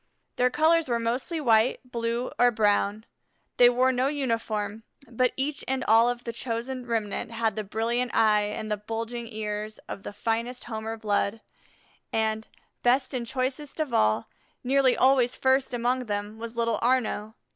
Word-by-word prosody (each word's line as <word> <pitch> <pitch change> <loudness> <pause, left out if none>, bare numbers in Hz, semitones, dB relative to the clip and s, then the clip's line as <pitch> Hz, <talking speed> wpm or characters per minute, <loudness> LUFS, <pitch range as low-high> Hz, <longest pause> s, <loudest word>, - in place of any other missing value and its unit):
Their 250 0 +4
colors 315 +2 +3
were 235 - +2
mostly 245 +8 -2
white, 230 -3 +3
blue, 235 0 -2
or 245 - +6
brown. 210 -1 +1 0.5
They 245 0 +8
wore 255 +1 +3
no 255 +1 +1
uniform, 230 -6 -2 0.3
but 250 +1 +1
each 285 +2 -1
and 265 0 -1
all 225 +2 +5
of 245 0 -3
the 235 - -5
chosen 245 +2 -4
remnant 225 -3 -2
had 225 -2 -1
the 215 - -2
brilliant 230 +4 -1
eye 210 -2 +4
and 215 +1 -4
the 210 - +1
bulging 230 +3 -5
ears 215 -1 -4
of 195 - -6
the - - -7
finest 230 +4 -2
Homer 225 -1 -5
blood; 210 0 0 0.7
and, 220 0 0 0.3
best 255 +3 +2
and 240 -2 -3
choicest 265 +4 -3
of 300 -6 -2
all, 110 - +2 0.4
nearly 265 0 +3
always 255 -2 +4
first 265 0 +2
among 250 +1 0
them 205 +1 -4
was 230 0 -7
little 230 -1 +1
Arnaux. 230 -3 0
235 Hz, 160 wpm, -27 LUFS, 220-255 Hz, 0.7 s, They